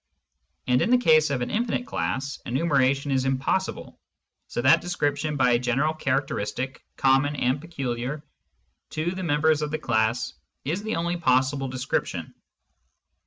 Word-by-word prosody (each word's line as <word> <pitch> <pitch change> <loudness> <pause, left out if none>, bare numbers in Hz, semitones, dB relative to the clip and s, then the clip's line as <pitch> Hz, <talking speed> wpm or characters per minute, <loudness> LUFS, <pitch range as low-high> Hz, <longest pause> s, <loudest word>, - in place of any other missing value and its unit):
And 125 0 +3
in - - +1
the 250 - +6
case 155 -10 +4
of 135 -3 -1
an - - -4
infinite 240 +2 -1
class, 135 - -3
enumera 135 0 +2
tion 140 +1 -5
is 130 -1 +2
impossible, 135 +8 -1 0.5
so 120 - -3
that 130 - +6
description 150 -3 -1
by 125 -2 +4
a 120 - +4
general 130 +6 +1
charac 140 -3 0
teristic 125 +3 -4 0.2
common 135 +2 +3
and 130 +1 0
peculiar 140 -3 -4 0.7
to 155 +3 -2
the 185 +1 -5
members 155 -2 +2
of 150 - -1
the 155 - -2
class 120 -2 0 0.3
is 165 +8 -1
the 220 +1 -2
only 170 +1 -1
possible 135 -2 +2
description. 130 +1 -3
140 Hz, 155 wpm, -25 LUFS, 130-155 Hz, 0.7 s, the